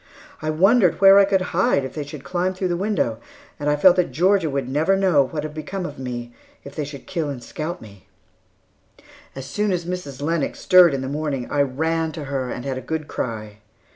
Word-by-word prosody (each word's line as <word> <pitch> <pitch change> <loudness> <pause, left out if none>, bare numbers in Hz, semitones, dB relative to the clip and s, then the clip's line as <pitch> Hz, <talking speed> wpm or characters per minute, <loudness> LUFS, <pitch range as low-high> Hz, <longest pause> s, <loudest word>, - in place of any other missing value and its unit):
I 155 - -2
wondered 185 +4 +3
where 195 +1 +8
I 200 - +6
could 195 -1 +1
hide 165 -6 +2
if 130 - -7
they 150 - -4
should 145 -1 -10
climb 185 +1 -1
through 185 0 -2
the 175 - 0
window, 210 +9 -1 0.4
and 145 0 -1
I 150 - +3
felt 180 +5 +5
that 180 - +1
Georgia 185 0 +2
would 135 -2 -2
never 155 +8 +1
know 175 -9 +3
what 150 0 -4
had 155 -1 -6
become 180 +5 -5
of - - -7
me, 120 -2 -6 0.3
if 140 - -10
they 150 - -3
should 140 -1 -10
kill 165 -5 -3
and 130 -4 -6
scalp 160 +7 -5
me. 100 -3 -15 1.3
As 135 -1 -7
soon 210 +7 -1
as 175 -2 -2
Mrs. 175 -7 -5
Lennox 155 +1 -2
stirred 180 -5 +6
in 135 - -3
the 130 - -4
morning, 140 -3 -3
I 145 - +2
ran 160 +4 -1
to 155 -1 -6
her 135 -2 -3
and 125 - -6
had 130 -1 -3
a - - -9
good 155 +3 -4
cry. 110 -3 -5
155 Hz, 220 wpm, -22 LUFS, 135-180 Hz, 1.3 s, where